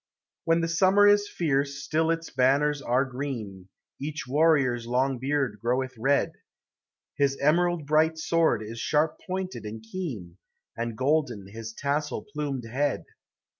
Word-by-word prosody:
When 165 +1 +3
the 165 - 0
summer 190 +5 +4
is 205 0 +5
fierce 140 -3 -1
still 160 +1 +1
its 165 0 -2
banners 140 +3 +2
are 130 0 +1
green, 120 -8 -6 0.3
Each 150 +1 -4
warrior's 135 -5 +2
long 130 +1 +1
beard 140 0 -1
groweth 130 +2 0
red, 135 +5 +1 0.9
His 140 -1 +2
emerald 170 +2 +2
bright 155 +2 +3
sword 160 -7 +2
is 115 +2 -7
sharp 155 +5 +1
pointed 185 0 -4
and 110 +1 -7
keen, 110 - -6 0.4
And 115 -1 -4
golden 130 -7 0
his 110 +2 -7
tassel 145 +5 -2
plumed 140 -5 -3
head. 135 +4 -1
140 Hz, 135 wpm, -27 LUFS, 120-160 Hz, 0.9 s, is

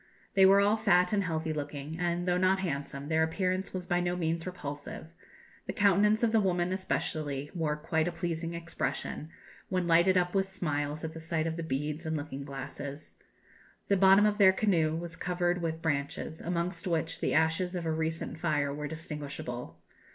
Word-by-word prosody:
They 190 -1 +7
were 195 +1 +7
all 205 +2 +4
fat 180 -3 +3
and 200 -2 +2
healthy 160 -1 -1
looking, 145 0 -5
and, 175 0 -1
though 180 0 +2
not 185 +1 +4
handsome, 140 -4 -3
their 160 0 +2
appearance 185 +3 0
was 185 -1 -4
by 175 0 +1
no 175 0 0
means 165 0 -1
repulsive; 150 -2 -7 0.5
the - - -2
countenance 210 +1 +4
of 230 - +4
the 225 - +4
woman, 180 -2 +1
especially, 150 -6 -2
wore 160 -4 0
quite 160 +2 0
a - - 0
pleasing 170 0 -3
expression, 170 -2 -3 0.4
when 185 -1 0
lighted 170 +3 +5
up 180 0 +1
with 195 -1 +1
smiles 150 -4 -2
at 160 0 -4
the 160 - -7
sight 160 -1 -1
of 165 0 -1
the 170 - -4
beads 150 +1 -3
and 160 0 0
looking 145 -2 -5
glasses. 140 +1 -7 0.8
The 200 - +5
bottom 195 +2 +6
of 210 0 +1
their 190 -2 +8
canoe 170 -6 +2
was 170 0 -5
covered 175 0 0
with 165 -1 -3
branches, 145 +1 -2
amongst 175 +3 -2
which 165 -2 -1
the - - +1
ashes 160 +3 +2
of 175 -2 -3
a 160 - 0
recent 160 0 -2
fire 145 -4 0
were 150 +1 -4
distinguishable. 140 - -6
165 Hz, 185 wpm, -30 LUFS, 155-180 Hz, 0.8 s, their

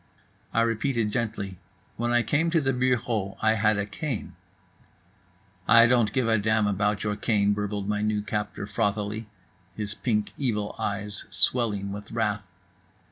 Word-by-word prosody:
I 115 - +2
repeated 115 -1 0
gently: 105 -5 -3 0.4
"When 120 +1 -1
I 120 0 +3
came 160 +6 +1
to 165 0 +3
the 135 -3 +1
bureau 120 -5 0
I 110 0 +3
had 110 -1 +2
a 100 - 0
cane." 125 +2 -4 1.3
"I 115 +2 +8
don't 120 -2 +3
give 130 -4 +1
a 110 -1 +3
damn 110 +1 +2
about 105 +1 0
your 105 -1 -1
cane," 105 -2 +2
burbled 105 -1 -3
my 105 0 0
new 105 -1 0
captor 105 -1 -3
frothily, 105 0 -1 0.5
his 105 -1 -3
pink 105 -3 -1
evil 105 -7 -1
eyes 100 0 -3
swelling 105 -5 +1
with 105 +2 -7
wrath. 110 -2 0
105 Hz, 150 wpm, -26 LUFS, 105-115 Hz, 1.3 s, I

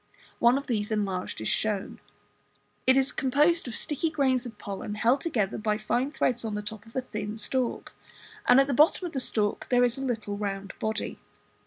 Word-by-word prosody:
One 240 +2 +5
of 280 - -4
these 210 -5 -1
enlarged 195 - -2
is 110 - -2
shown. 210 -3 -1 0.9
It 260 +1 +6
is 270 0 +2
composed 295 +5 +2
of 235 - -4
sticky 310 +2 -1
grains 265 -5 +1
of 225 -3 -11
pollen 200 +1 -5
held 240 +6 +2
together 215 - -1
by 215 -1 0
fine 240 +5 0
threads 245 -5 0
on 220 -2 -3
the 210 - -3
top 215 0 -8
of 225 - -17
a 260 - +1
thin 210 -3 -5
stalk; 250 +3 -1 0.5
and 250 +2 +7
at 275 - +5
the 275 - -1
bottom 305 +7 +4
of 345 - -4
the 270 - -1
stalk 210 -4 0
there 245 -1 +4
is 245 +1 +1
a - - -4
little 220 -6 -2
round 195 -1 -4
body. 220 0 -3
235 Hz, 200 wpm, -28 LUFS, 210-265 Hz, 0.9 s, and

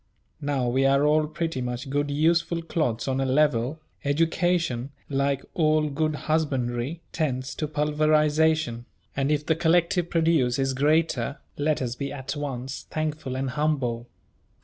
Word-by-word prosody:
Now 140 -4 0
we 130 +3 +2
are 140 +1 +3
all 150 +1 +3
pretty 160 -3 -3
much 125 +1 -4
good 145 +1 0
useful 165 +3 +1
clods 140 -9 -1
on 135 0 0
a - - +1
level: 140 0 +2 0.2
education, 165 -3 +1 0.2
like 140 0 0
all 155 -2 +2
good 155 +2 0
husbandry, 140 -1 -1
tends 135 -4 -2
to 155 - -3
pulverisation; 150 -3 +2 0.3
and 140 +1 0
if 150 0 0
the 160 - +2
collective 170 +1 +2
produce 160 -7 +2
is 135 -1 0
greater, 145 -2 +1 0.2
let 145 -1 0
us 120 -2 -2
be 140 +2 -4
at 135 +1 -5
once 135 -2 -5
thankful 155 -4 -3
and 130 0 -2
humble. 130 -6 -1
145 Hz, 145 wpm, -26 LUFS, 130-155 Hz, 0.3 s, are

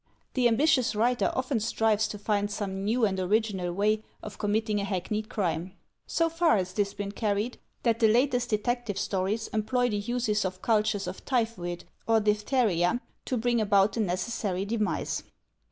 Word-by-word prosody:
The 250 -2 +3
ambitious 250 -1 +3
writer 240 +3 +2
often 260 -2 0
strives 220 -1 +1
to 210 - -6
find 205 0 0
some 195 -2 -3
new 225 +3 +2
and 190 -2 -1
original 190 -2 0
way 210 +4 +1 0.2
of 210 - -8
committing 210 0 0
a - - -1
hackneyed 210 +2 -2
crime. 180 -2 -2 0.3
So 330 - +2
far 330 -5 +3
has 185 -1 -2
this 200 -1 -1
been 200 -1 -4
carried, 210 +3 -1 0.2
that 230 -2 +2
the 225 - +5
latest 245 +2 +2
detective 230 0 -1
stories 200 +4 -1
employ 245 +3 +1
the 205 - 0
use 215 0 0
of 185 -1 -4
cultures 215 -2 +2
of - - -6
typhoid 225 -9 -1 0.2
or 225 -1 +4
diphtheria 210 -2 +2 0.3
to 255 - -1
bring 240 0 +1
about 200 -1 +3
the - - -3
necessary 190 0 -1
demise. 215 0 -1
215 Hz, 165 wpm, -28 LUFS, 200-235 Hz, 0.3 s, the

